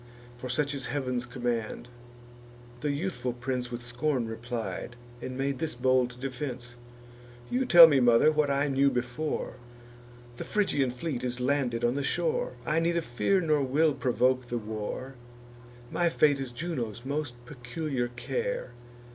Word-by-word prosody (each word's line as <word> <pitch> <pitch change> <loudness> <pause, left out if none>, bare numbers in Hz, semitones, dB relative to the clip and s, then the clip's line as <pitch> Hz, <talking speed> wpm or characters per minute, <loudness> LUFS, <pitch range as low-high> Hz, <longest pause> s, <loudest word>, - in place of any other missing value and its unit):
For 125 +1 -7
such 145 +4 0
is 135 -3 -4
Heav'n's 125 -4 -2
command." 120 -2 -3 0.9
The 150 - -1
youthful 140 -5 -2
prince 125 0 -3
With 120 0 -6
scorn 125 0 -1
replied, 115 -1 -5 0.3
and 130 0 -5
made 135 -1 -1
this 160 -4 -2
bold 125 0 +2
defence: 125 -2 -5 0.8
"You 255 +1 +1
tell 170 -5 +11
me, 145 -4 +4
mother, 120 +4 +5
what 150 -2 +2
I 140 +1 +2
knew 140 0 +3
before: 125 +5 -3 0.8
The - - -4
Phrygian 145 -11 +1
fleet 125 +1 -4
is 125 0 -3
landed 125 -3 +1
on 120 - +2
the 140 - -1
shore. - - 0
I 155 +1 +2
neither 170 +1 +1
fear 165 +9 +1
nor 155 -3 +2
will 145 +4 +3
provoke 125 -1 +1
the 120 - -2
war; 110 +4 -5 0.8
My 175 -1 +2
fate 145 -3 +3
is 135 -2 -4
Juno's 120 - -4
most 140 -2 -2
peculiar 130 0 -3
care. 480 - -3
130 Hz, 145 wpm, -29 LUFS, 120-150 Hz, 0.9 s, tell